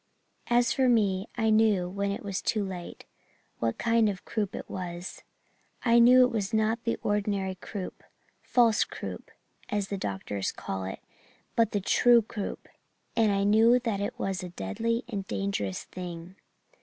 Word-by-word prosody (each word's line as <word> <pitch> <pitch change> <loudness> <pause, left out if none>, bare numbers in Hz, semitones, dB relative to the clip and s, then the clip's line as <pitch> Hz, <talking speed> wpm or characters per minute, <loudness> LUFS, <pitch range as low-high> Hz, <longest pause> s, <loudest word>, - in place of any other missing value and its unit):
"As 240 0 +3
for 260 -2 +3
me, 200 -4 +2
I 220 -1 +2
knew, 215 -5 +3
when 200 +2 -2
it 200 - -5
was 200 -2 -3
too 215 -2 0
late, 180 -2 -7 0.5
what 115 -1 -1
kind 230 -2 +3
of 190 -2 -6
croup 210 -4 -2
it - - -6
was. 175 0 -6 0.6
I 235 0 +6
knew 250 +2 +8
it 250 - +2
was 215 -1 -1
not 220 +2 +1
the 230 - 0
ordinary 200 -2 0
croup 185 +1 -7 0.4
'false 235 -3 +3
croup' - - -7 0.4
as 205 -2 -1
doctors 100 - -3
call 95 -1 -5
it 95 - -6 0.5
but 230 -1 +3
the 205 - 0
'true 235 +4 +5
croup' 210 -1 -6 0.5
and 220 -2 +3
I 200 0 +1
knew 220 +4 +5
that 225 -5 -2
it 205 - -3
was 195 -2 -2
a 180 - -6
deadly 230 - -2
and 200 -5 -5
dangerous 195 - -2
thing. 175 0 -8
205 Hz, 160 wpm, -28 LUFS, 185-230 Hz, 0.6 s, knew